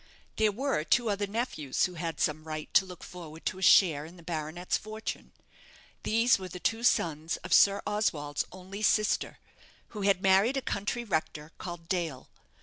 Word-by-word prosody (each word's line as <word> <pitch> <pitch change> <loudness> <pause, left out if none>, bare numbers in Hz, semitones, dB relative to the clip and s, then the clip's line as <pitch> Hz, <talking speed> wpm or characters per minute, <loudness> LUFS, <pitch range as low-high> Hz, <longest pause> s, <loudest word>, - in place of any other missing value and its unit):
There 215 -1 +3
were 260 - -1
two 230 +6 +2
other 205 0 -1
nephews 200 - -1
who 180 - -5
had 165 -1 -4
some 155 0 0
right 155 -1 -6
to 190 - +5
look 180 -1 -10
forward 165 -3 -10
to 185 - -2
a - - -10
share 175 -6 +6
in 165 +4 -12
the 170 - -14
baronet's 165 +2 -3
fortune. 215 +1 -5 0.7
These 230 0 +3
were 185 - -6
the 180 +1 -8
two 225 +5 0
sons 160 -8 +1
of - - -2
Sir 200 0 +5
Oswald's 155 -9 -1
only 190 +2 -9
sister, 215 0 +2 0.5
who 210 - -7
had 195 -1 +2
married 195 +7 +4
a - - 0
country 215 +4 -2
rector, 160 -6 -3
called 175 -2 -7
Dale. 165 -8 -3
185 Hz, 175 wpm, -29 LUFS, 160-210 Hz, 0.7 s, share